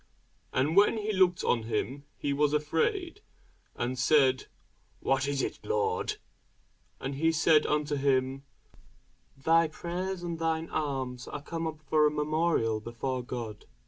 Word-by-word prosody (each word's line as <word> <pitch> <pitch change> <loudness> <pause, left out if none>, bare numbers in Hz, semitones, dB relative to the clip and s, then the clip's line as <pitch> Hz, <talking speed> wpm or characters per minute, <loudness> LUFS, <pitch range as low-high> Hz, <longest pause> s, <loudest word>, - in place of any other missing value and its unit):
And 145 +5 +1
when 205 +3 +5
he 215 0 -2
looked 185 -2 +3
on 120 - +2
him, 120 +6 -3
he 140 - -1
was 145 +1 +2
afraid, 335 - 0 0.5
and 125 +1 -2
said, 130 -1 +3 0.5
What 135 +1 +1
is 140 -1 0
it, - - -3
Lord? 450 -1 0 0.8
And 135 +1 -4
he 160 +4 +2
said 155 -1 +4
unto 150 0 0
him, 135 -1 +1 0.9
Thy 165 +4 +4
prayers 175 +3 -4
and 170 -2 -4
thine 165 0 -1
alms 130 -4 -3
are 145 - -6
come 165 +1 -3
up 155 -1 -6
for 150 +1 +4
a - - +3
memorial 150 -6 +1
before 120 +3 -3
God. 115 -3 -6
150 Hz, 145 wpm, -29 LUFS, 135-165 Hz, 0.9 s, when